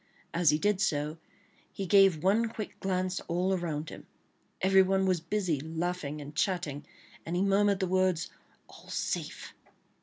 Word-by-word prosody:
As 170 -2 +3
he 150 - +4
did 205 +2 +1
so, 150 -3 -1 0.5
he 195 - -5
gave 190 -4 +5
one 215 +5 +3
quick 220 -2 -7
glance 185 -1 -1
all 180 +3 0
around 160 -4 -3
him. - - -11 0.5
Everyone 190 0 +4
was 185 -2 +2
busy 175 -3 -1
laughing 160 0 -3
and 145 0 -8
chatting, 155 -6 -1 0.4
and 170 - -4
he 180 - +2
murmured 200 0 +3
the 190 - +1
words 185 -2 +1 0.4
"All - - -15
safe!" - - -4
185 Hz, 150 wpm, -30 LUFS, 160-195 Hz, 0.5 s, gave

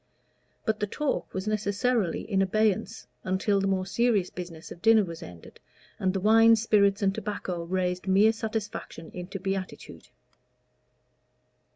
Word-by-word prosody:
But 220 -1 0
the 210 - -1
talk 295 +7 -2
was 190 +2 -4
necessarily 210 -1 0
in 195 -3 0
abeyance 215 +1 0 0.2
until 190 +2 +1
the 195 - 0
more 190 -1 0
serious 210 -2 +1
business 175 -3 -8
of 170 - -10
dinner 225 -1 +5
was 165 -3 -7
ended, 90 -2 -12 0.4
and 190 - +1
the 190 - -2
wine, 225 +3 +6
spirits, 205 -2 +2
and 195 -1 +2
tobacco 185 -5 -4
raised 180 +1 -2
mere 200 +4 +5
satisfaction 215 -7 -5
into 180 +2 -6
beatitude. 195 0 -5
195 Hz, 140 wpm, -27 LUFS, 185-215 Hz, 0.4 s, wine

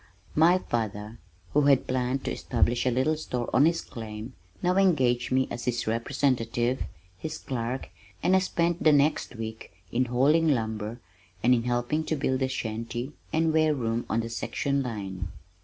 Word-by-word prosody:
My 170 +4 +5
father, 110 - -3 0.3
who 150 - +5
had 140 -2 +5
planned 130 +1 -1
to - - -1
establish 120 0 +1
a - - +5
little 130 +6 +2
store 125 -6 -3
on 145 - +6
his 165 0 +1
claim, 110 +1 -8 0.3
now 180 +1 +2
engaged 130 -11 +3
me 130 0 +3
as 120 - -5
his 120 -1 -1
representative, 120 0 0 0.4
his 155 - -4
clerk, 125 0 -4 0.3
and 185 - +4
I - - +6
spent 175 -2 0
the 155 - +6
next 145 -2 +2
week 110 0 -6 0.2
in 125 +2 +2
hauling 140 +7 +3
lumber 110 -4 -1 0.4
and 125 +2 +6
in 115 -1 +1
helping 120 +6 0
to 160 - 0
build 130 -2 0
the 130 - +1
shanty 120 +2 -4 0.2
and 160 0 +2
ware 155 -1 +3
room 115 -2 -2
on 115 - +1
the 115 - -5
section 140 +4 -1
line. 100 -7 -4
125 Hz, 170 wpm, -27 LUFS, 115-150 Hz, 0.4 s, on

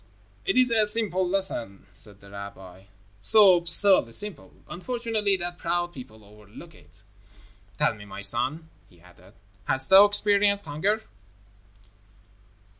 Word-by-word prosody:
"It - - -1
is 255 -1 +3
a 220 -2 +2
simple 205 -4 -1
lesson," 180 - -3
said 105 -1 -7
the 100 0 -17
rabbi, 95 -2 -12 0.3
"so 195 - +6
absurdly 170 - +3
simple, 210 - -1 0.2
unfortunately, 220 0 -3
that 175 0 -7
proud 175 +1 -3
people 110 -6 -13
overlook 105 +10 -16
it. 95 - -16 0.7
Tell - - 0
me, 105 -2 -13
my 100 0 -10
son," 135 +9 0 0.2
he 90 - -23
added. 90 +1 -21 0.3
"Hast 130 - 0
thou 195 +2 +8
experienced 205 -1 0
hunger?" 195 +9 -2
170 Hz, 125 wpm, -24 LUFS, -, 0.7 s, thou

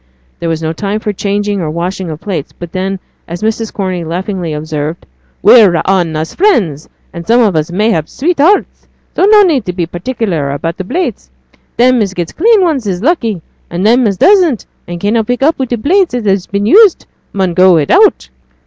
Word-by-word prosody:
There 170 - -3
was 165 0 -3
no 160 0 -2
time 200 +4 -3
for 215 -1 -3
changing 205 0 -2
or 160 - -3
washing 175 +3 -4
of 155 -1 -6
plates; 180 -8 -4
but 175 -1 -9
then, 190 +1 -3 0.3
as 170 +4 -7
Mrs. 220 0 -2
Corney 185 -3 -3
laughingly 175 +1 -4
observed, 155 +1 -5 0.4
'We're 210 -8 +6
a' 165 - 0
on 180 -4 0
us 155 +1 -4
friends, 195 - 0 0.2
and 170 -1 -8
some 235 +2 +4
on 205 -7 +2
us 155 +2 -1
mayhap 205 -4 0
sweethearts; 340 +5 0 0.3
so - - +2
no 420 0 +6
need 305 - +1
to 180 - -3
be 175 -2 -2
particular 175 - -3
about 165 +6 -4
plates. 360 +1 -3 0.5
Them 250 0 +3
as 195 -2 -2
gets 175 -2 -4
clean 440 +3 +3
ones 300 - 0
is 185 0 -3
lucky; 230 - 0 0.3
and 175 +3 -3
them 240 +2 +4
as 195 -2 -2
doesn't, 355 - +3 0.2
and 175 0 -6
cannot 210 +3 0
put 245 +2 -1
up 315 +1 +2
wi' 260 - -1
plates 310 - +1
that 245 -3 -3
has 195 -2 0
been 200 0 -2
used, 405 - +5 0.3
mun 190 -3 -1
go 185 +1 +5
without.' 65 - +2
195 Hz, 195 wpm, -12 LUFS, 170-245 Hz, 0.5 s, We're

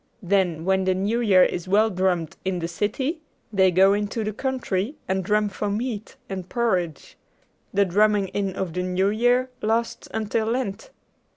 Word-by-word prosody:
Then 180 -4 +1
when 190 0 +2
the 185 0 +2
New 205 +5 0
Year 190 -5 +6
is 175 - -1
well 215 +3 +3
drummed 180 -4 0
in 190 -1 -1
the 165 -1 -2
city, 260 - -2 0.3
they 190 -2 +5
go 190 +2 +5
into 205 +2 -1
the 215 0 -3
country 255 -1 -2
and 190 0 0
drum 210 +2 +2
for 205 +1 -3
meat 220 +1 -3
and 185 -2 -6
porridge. 185 - -1 0.5
The 200 0 +3
drumming 205 +1 +2
in 195 -2 -2
of 185 -4 -3
the 180 - -1
New 185 +2 +1
Year 245 +4 +2
lasts 225 +2 -1
until 220 0 -1
Lent." 225 -3 -2
200 Hz, 170 wpm, -24 LUFS, 185-220 Hz, 0.5 s, Year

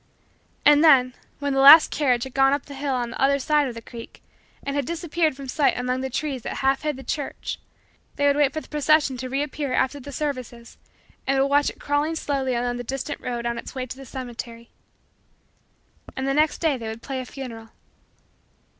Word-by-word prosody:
And 295 +1 +6
then, 260 -5 +6 0.2
when 285 -1 -2
the 270 - +1
last 285 +4 +9
carriage 250 -5 +1
had 265 - -8
gone 270 0 +4
up 285 - -2
the 285 - -10
hill 275 -1 -2
on 240 -1 -2
the - - -6
other 275 +1 +4
side 295 +1 +2
of 245 - -6
the 230 - -9
creek 235 -2 -11 0.4
and 280 - -3
had 285 - 0
disappeared 335 -1 -1
from 275 0 -9
sight 285 +2 +1
among 250 +1 -1
the 265 - -3
trees 270 0 -3
that - - -5
half 270 0 +1
hid 300 -2 -2
the 270 - -10
church, 285 +2 -4 0.6
they 285 - 0
would 285 0 +4
wait 290 -2 +3
for 310 - -4
the - - -15
procession 300 -2 +2
to 255 +1 -5
reappear 280 0 -2
after 275 +2 0
the 285 +2 -9
services 255 -5 -5 0.5
and 270 0 +2
would 270 - +4
watch 285 +1 +3
it - - -12
crawling 290 +3 0
slowly 270 -5 -1
along 245 0 -1
the 245 - -5
distant 270 +4 -5
road 240 -1 -4
on 235 0 -2
its - - -9
way 255 -1 -3
to 255 - -8
the 270 - -11
cemetery. 235 -2 -8 1.4
And 265 +1 -3
the 275 - +1
next 305 +2 +1
day 315 -5 +2
they 230 -2 -7
would 220 +1 -7
play 270 -2 -4
a - - -4
funeral. 230 -5 -8
270 Hz, 215 wpm, -24 LUFS, 250-290 Hz, 1.4 s, last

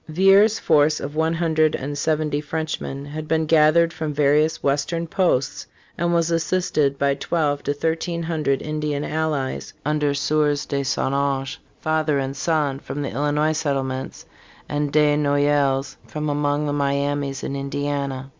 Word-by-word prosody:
Villiers' 195 +6 +5
force 155 -1 +3
of 145 +2 -6
one 160 +1 +1
hundred 160 -2 +2
and 145 +2 -4
seventy 150 0 0
Frenchmen 155 -2 -4
had 155 +2 -6
been 160 0 +1
gathered 160 +2 +4
from 155 -1 -3
various 150 +2 +2
western 145 +4 0
posts 150 -6 0 0.3
and 170 +1 0
was 170 -1 +1
assisted 160 -4 +1
by 140 0 +2
twelve 145 0 -1
to 145 - -1
thirteen 165 +3 -2
hundred 155 -5 -1
Indian 150 -1 -2
allies, 155 -4 -2
under 150 -1 +1
Sieurs 145 0 +1
de 140 -1 -1
Saint 135 0 -1
Ange, 140 -1 -1 0.2
father 155 -2 +1
and 135 0 -2
son, 145 -2 0
from 145 0 -5
the 140 - -3
Illinois 150 +3 +1
settlements, 135 -4 -3 0.4
and 145 -1 -1
De 150 0 +4
Noyelles, 145 -2 +1
from 150 0 -3
among 145 0 0
the 145 - -1
Miamis 140 -1 -1
in 140 - -3
Indiana. 140 -1 -3
150 Hz, 150 wpm, -22 LUFS, 140-155 Hz, 0.4 s, Villiers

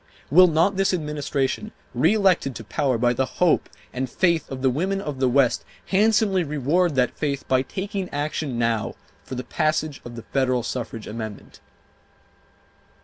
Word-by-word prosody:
Will 180 +4 +8
not 170 +4 +2
this 195 -1 +2
Administration, 150 +4 -2 0.2
reelected 170 - +3
to 115 - -7
power 130 +3 0
by 120 +1 +2
the 130 +2 0
hope 180 -2 +3 0.2
and 130 0 -2
faith 170 -1 +1
of 130 -1 -6
the 130 - +5
women 190 +9 -1
of 150 -8 -5
the 130 -1 +3
West, 130 -1 +3 0.2
handsomely 205 -2 +3
reward 150 +3 +1
that 125 -1 +1
faith 140 -3 -2
by 130 -1 +3
taking 190 - -4
action 145 -2 -3
now 115 -2 0 0.3
for 130 - -7
the 125 - -4
passage 155 +1 -1
of 120 -1 -9
the 115 - -8
federal 130 -3 0
suffrage 115 -2 -5
amendment? 110 -2 -7
145 Hz, 155 wpm, -24 LUFS, 125-180 Hz, 0.3 s, Will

